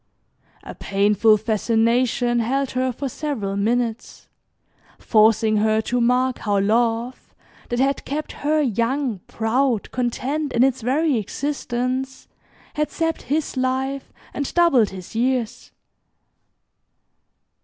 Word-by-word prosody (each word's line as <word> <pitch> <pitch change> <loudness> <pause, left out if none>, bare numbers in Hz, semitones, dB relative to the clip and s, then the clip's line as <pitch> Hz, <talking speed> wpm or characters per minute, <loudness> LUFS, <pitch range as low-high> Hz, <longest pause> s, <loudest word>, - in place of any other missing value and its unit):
A - - -8
painful 205 +2 +2
fascination 230 +3 +1
held 265 +4 -1
her 255 0 0
for 275 +3 -4
several 250 -8 -3
minutes, 230 +2 -2 0.7
forcing 220 0 +3
her 215 +1 +2
to 245 +2 -1
mark 250 +1 +1
how 205 -2 0
love, 230 +4 -1 0.3
that 240 - -2
had 275 +2 +1
kept 300 +2 -4
her 305 +2 0
young, 240 -1 -1
proud, 230 0 0
content 270 +4 -2
in 235 - +4
its 265 -1 +1
very 275 +4 +1
existence, 255 +2 -3 0.5
had 300 0 -1
sapped 325 -1 -2
his 295 +3 -2
life, 265 +1 -2 0.2
and 285 -1 -3
doubled 280 - +4
his 185 +1 -10
years. 240 0 -1
245 Hz, 110 wpm, -22 LUFS, 225-270 Hz, 0.7 s, in